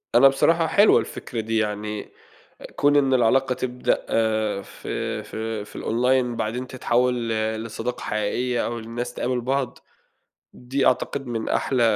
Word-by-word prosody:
أنا 130 +3 +9
بصراحة 165 +5 +3
حلوة 205 +6 +5
الفكرة 120 - -5
دي 110 0 -1
يعني، 105 -1 -2 0.5
أ - - -11
كون 145 0 +3
إن 135 -2 +4
العلاقة 130 +2 +3
تبدأ 125 0 0 0.7
في - - -5
في 110 -1 -4
في - - -10
الOnline 125 +1 +1
بعدين 120 +4 -2
تتحول 125 -1 0
ل 110 0 -1
لصداقة 115 +2 -4
حقيقية 120 +4 -1
أو 120 0 -3
الناس 120 +2 -5
تقابل 125 0 -1
بعض، 130 +1 -1 0.7
دي 130 +2 -2
أعتقد 135 +2 +1
من 115 -2 -3
أحلى 130 -3 +1
120 Hz, 140 wpm, -24 LUFS, 110-130 Hz, 0.7 s, أنا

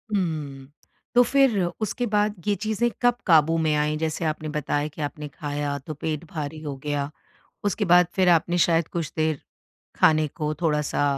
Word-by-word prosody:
हुँ, 150 -7 -3 0.5
तो 245 - +8
फिर 255 -5 +3 0.2
उसके 230 +3 -1
बाद 210 0 +2
ये 205 - +3
चीज़ें 220 +2 +1
कब 245 -1 +4
काबू 165 -2 +5
में 155 -2 +1
आईं? 150 +1 +1
जैसे 160 +1 -2
आपने 155 0 -2
बताया 150 0 -1
कि 155 +1 -9
आपने 150 +1 -4
खाया 145 0 -3
तो 155 +3 -7
पेट 155 +1 -4
भारी 155 0 -5
हो 145 -3 -5
गया, 145 -1 -2 0.6
उसके 205 +1 0
बाद 180 -1 +6
फिर 185 -2 +3
आपने 175 +1 +3
शायद 165 -1 +1
कुछ 165 -4 -4
देर 155 -2 0 0.6
खाने 155 -1 +4
को 150 +1 -3
थोड़ा-सा 150 -2 +1
155 Hz, 170 wpm, -24 LUFS, 150-180 Hz, 0.6 s, तो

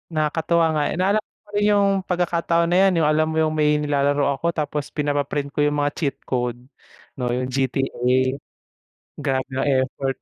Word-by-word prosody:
Nakakatuwa 160 +2 +1
nga 150 - +1
eh, - - -3
naalala 200 +4 +2
ko - - -89
pa - - -24
rin 205 0 +1
yung 200 -1 +4
pagkakataon 170 -2 0
na - - +4
yan, 180 - 0
yung 150 - +3
alam 155 +1 +2
mo 160 - -3
yung 155 -1 +2
may 150 -1 +2
nilalaro 145 -1 +1 0.2
ako 170 - +1
tapos 150 -3 -3
pinapa-print 145 -1 -2
ko 145 - 0
yung 145 0 +1
mga 145 0 +1
cheat 145 -4 -1
code 125 -1 -2 0.6
'no 125 -2 -3
yung 125 +1 -1
GTA. 135 +1 -1 1.2
Grabe 135 -3 -2
yung 135 +1 -2 0.2
effort. 135 0 -3
150 Hz, 180 wpm, -22 LUFS, 140-165 Hz, 1.2 s, yung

